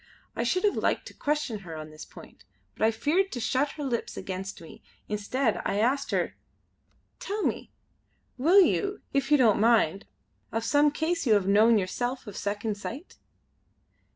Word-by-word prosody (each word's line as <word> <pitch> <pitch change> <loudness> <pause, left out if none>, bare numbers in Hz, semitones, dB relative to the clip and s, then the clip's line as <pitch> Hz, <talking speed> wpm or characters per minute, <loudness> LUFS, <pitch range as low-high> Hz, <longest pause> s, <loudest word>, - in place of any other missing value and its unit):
I - - -2
should 365 +11 0
have 415 - +3
liked - - 0
to - - -16
question 290 -7 -2
her 170 -4 -9
on 155 0 -8
this 155 0 -10
point; - - -15 0.3
but - - -4
I 220 - +6
feared 320 - +1
to 245 - -3
shut 260 +5 0
her 300 - -6
lips 245 -4 -3
against 190 +1 -5
me. 165 - -13 0.3
Instead 215 +3 -1
I 200 - -1
asked 265 +5 +1
her: - - 0 0.9
"Tell 415 +2 -3
me, - - -2 0.7
will 340 +10 +6
you, 400 +2 +1
if 275 +1 0
you 295 - +7
don't 230 -7 +4
mind, 215 -5 +3 0.4
of 225 0 -2
some 290 +5 +4
case 320 +1 -1
you 220 - +5
have 200 -2 +1
known 215 +3 +5
yourself 245 +7 -2
of 205 -3 -9
Second 205 +1 -3
Sight?" 265 - -8
235 Hz, 175 wpm, -27 LUFS, 205-295 Hz, 0.9 s, you